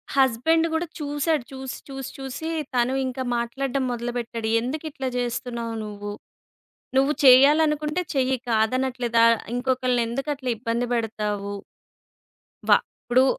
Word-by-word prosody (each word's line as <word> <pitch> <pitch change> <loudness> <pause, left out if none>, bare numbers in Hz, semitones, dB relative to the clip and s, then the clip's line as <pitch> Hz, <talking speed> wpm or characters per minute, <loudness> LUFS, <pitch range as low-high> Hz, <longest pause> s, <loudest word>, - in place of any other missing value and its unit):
Husband 275 +6 +3
కూడా 330 +2 0
చూసాడు. 295 0 0
చూసి, 265 -1 -6
చూసి, 270 -1 -6
చూసి 270 +4 -5 0.3
తను 245 +1 +2
ఇంకా 260 0 -3
మాట్లాడడం 265 +3 -1
మొదలుపెట్టాడు. 235 -1 -3
"ఎందుకు 290 +6 -4
ఇట్లా 265 -2 -4
జేస్తున్నావు 235 -1 -3
నువ్వు. 205 -1 -6 0.9
నువ్వు 275 +2 +4
చెయ్యాలనుకుంటే 300 +4 +5
చెయ్యి 265 -1 +1
కాదనట్లేదా. 240 +1 +2 0.3
ఇంకొకల్ని 255 -1 +1
ఎందుకు 270 +5 -3
అట్లా 260 -2 -5
ఇబ్బంది 235 +1 -1
పెడతావు." 210 -3 -2 1.1
వ - - +6 0.3
ఇప్పుడు 255 +2 +4
255 Hz, 110 wpm, -24 LUFS, 235-275 Hz, 1.1 s, వ